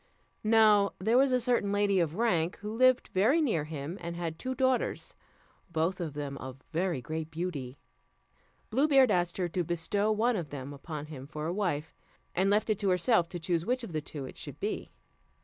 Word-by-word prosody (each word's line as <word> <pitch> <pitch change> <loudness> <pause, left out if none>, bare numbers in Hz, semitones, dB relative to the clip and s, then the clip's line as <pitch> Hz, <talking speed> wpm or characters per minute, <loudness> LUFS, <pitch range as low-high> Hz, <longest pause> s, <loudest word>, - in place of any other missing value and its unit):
Now 215 -2 +5
there 220 +6 +1
was 270 0 +4
a 255 - +3
certain 240 -4 +1
lady 205 -1 +2
of 165 -2 0
rank, 180 -7 +1
who 210 +1 -4
lived 255 +1 +4
very 225 - +4
near 220 - +1
him, 155 +3 -6
and 170 0 -5
had 165 -2 -4
two 260 0 -3
daughters, 260 -1 0 0.6
both 170 +3 0
of 160 -4 -3
them 140 -2 -4
of 130 +1 -9
very 170 -4 0
great 160 +1 -4
beauty. 155 -6 -4 0.9
Blue 270 +7 +3
Beard 270 -5 +5
asked 175 -2 +1
her 180 -2 0
to 175 +2 -1
bestow 175 +6 0
one 225 +3 +2
of 170 -7 -3
them 140 0 -6
upon 150 +1 -6
him 140 -3 -9
for 150 0 -5
a 170 - -1
wife, 170 -6 -2 0.4
and 190 +2 +2
left 210 +2 +2
it 210 - 0
to 200 -2 +1
herself 180 -1 +3
to 175 - -5
choose 165 0 0
which 250 +5 -1
of 190 - -7
the 155 - -1
two 145 -1 -7
it - - -10
should - - -8
be. - - -3
180 Hz, 200 wpm, -30 LUFS, 160-215 Hz, 0.9 s, Now